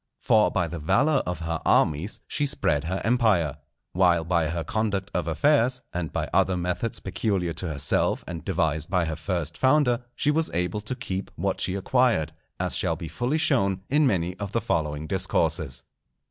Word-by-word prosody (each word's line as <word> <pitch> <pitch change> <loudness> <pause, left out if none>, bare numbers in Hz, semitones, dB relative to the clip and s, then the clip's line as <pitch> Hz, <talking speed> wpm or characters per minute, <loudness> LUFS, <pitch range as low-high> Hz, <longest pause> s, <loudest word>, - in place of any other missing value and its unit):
For - - +4
by 85 - 0
the 85 +1 -6
valour 135 - +2
of 90 -2 -3
her 80 0 -3
armies 80 +7 +1
she 145 - 0
spread 80 - 0
her 95 +3 -2
empire, 105 - +2 0.4
while 90 -2 +3
by 85 -1 +1
her 85 +1 -2
conduct 105 -2 -2
of 90 -2 -1
affairs, 125 - +2
and 85 -2 -3
by - - -2
other 95 -1 +3
methods 90 +6 -2
peculiar 95 -2 -1
to 90 - -4
herself 75 -3 0
and 85 -3 -6
devised 80 -4 -1
by 90 -3 +1
her 80 0 -3
first 85 -1 -3
founder, 130 -3 +3
she 145 - +1
was 160 +1 +1
able 90 +4 -1
to 110 +5 -4
keep 95 -4 -4
what - - -2
she 95 - +1
acquired, 100 -6 +1 0.3
as - - +1
shall - - +1
be 85 - -7
fully 125 +6 -1
shown 100 - +2
in 150 0 +4
many 90 -5 0
of 100 -1 -6
the 115 - +1
following 75 -4 -1
Discourses. 80 -7 0
90 Hz, 180 wpm, -25 LUFS, 80-115 Hz, 0.4 s, For